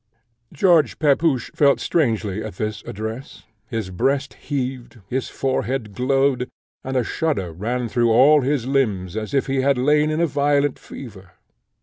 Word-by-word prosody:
George 170 -1 +3
Pepusch 145 -3 +2
felt 140 -2 +3
strangely 110 - 0
at 110 -4 -7
this 105 0 -3
address; 110 +5 -6 0.2
his 110 -6 -4
breast 140 +9 0
heaved, 130 -4 -5
his 130 +3 -2
forehead 130 -4 -2
glowed, 130 +1 +1 0.3
and 130 0 -2
a 125 - +2
shudder 110 - -2
ran 120 +7 -2
through 120 +1 +1
all 145 +6 +6
his 135 -2 0
limbs 110 -10 0
as 110 +2 -4
if 135 - +2
he 135 -1 0
had 140 0 +2
lain 150 +4 +3
in 155 +1 -1
a 170 - +3
violent 145 -2 +1
fever. 95 -7 -11
130 Hz, 150 wpm, -22 LUFS, 110-140 Hz, 0.3 s, all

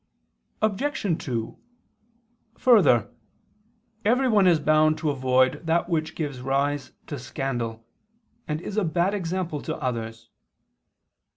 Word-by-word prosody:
Obj. 210 - 0
2: 115 -4 -4 1.0
Further, 190 - +5 1.0
everyone 225 -3 +3
is 170 -3 +5
bound 155 +1 +3
to 155 -3 0
avoid 130 +1 +2
that 170 +2 +1
which 160 -2 -1
gives 145 -5 -4
rise 140 +1 -1
to 145 - -6
scandal, 120 -3 -4 0.6
and 150 0 -2
is 200 - -6
a 215 - +3
bad 175 +3 +1
example 175 -5 -2
to - - -4
others. 115 -2 -4
155 Hz, 110 wpm, -25 LUFS, 130-180 Hz, 1.0 s, Further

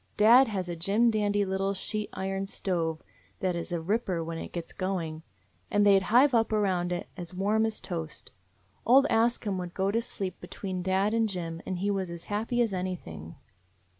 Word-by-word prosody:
Dad 235 +5 +7
has 190 -4 -3
a 175 - -3
jim 205 +8 +2
dandy 205 -1 +1
little 195 +1 -1
sheet 210 +2 -2
iron 195 +1 -3
stove 165 -5 -2 0.4
that 185 -2 0
is 170 +2 -4
a 170 - -1
ripper 185 -1 -1
when 165 0 -5
it - - -7
gets 170 -1 -6
going, 170 -5 -3 0.5
and 205 -2 +3
they 200 -1 +7
'd 190 - -7
hive 255 +5 +6
up 225 -2 +3
around 185 -5 +1
it 175 - -3
as 175 0 -7
warm 215 +4 +2
as 220 - -4
toast. 165 -4 -6 0.5
Old 265 +4 +6
Ask 235 +1 +2
Him 195 -3 -1
would 175 -1 -6
go 195 +1 +1
to 230 +2 +1
sleep 190 -5 -5
between 185 -2 -5
dad 190 +3 +1
and 225 -1 +2
Jim 165 -3 -4
and 185 - -2
he 200 +3 0
was 190 -3 -2
as 170 -1 -8
happy 230 +4 0
as 225 -4 -2
anything. 165 - -5
195 Hz, 195 wpm, -28 LUFS, 175-215 Hz, 0.5 s, Dad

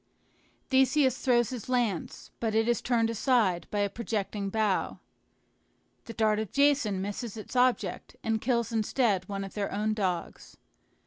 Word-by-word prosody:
Theseus 265 0 +3
throws 240 -3 +2
his 250 -2 -6
lance, 235 -9 -1
but 220 -2 -1
it 225 +1 +2
is 240 -2 +1
turned 230 -2 +1
aside 220 -6 +1
by 205 - -1
a 200 - +2
projecting 205 -2 -3
bough. 215 -2 0 1.1
The 230 - -7
dart 215 -1 +2
of 220 -3 -4
Jason 275 -9 +2
misses 205 +2 -5
its 215 +4 -9
object, 250 0 +1
and 220 -1 0
kills 235 -2 0
instead 215 -3 0
one 195 -1 -3
of 195 - -8
their 205 -2 -2
own 215 +2 0
dogs. 185 -5 -3
220 Hz, 150 wpm, -29 LUFS, 205-245 Hz, 1.1 s, Theseus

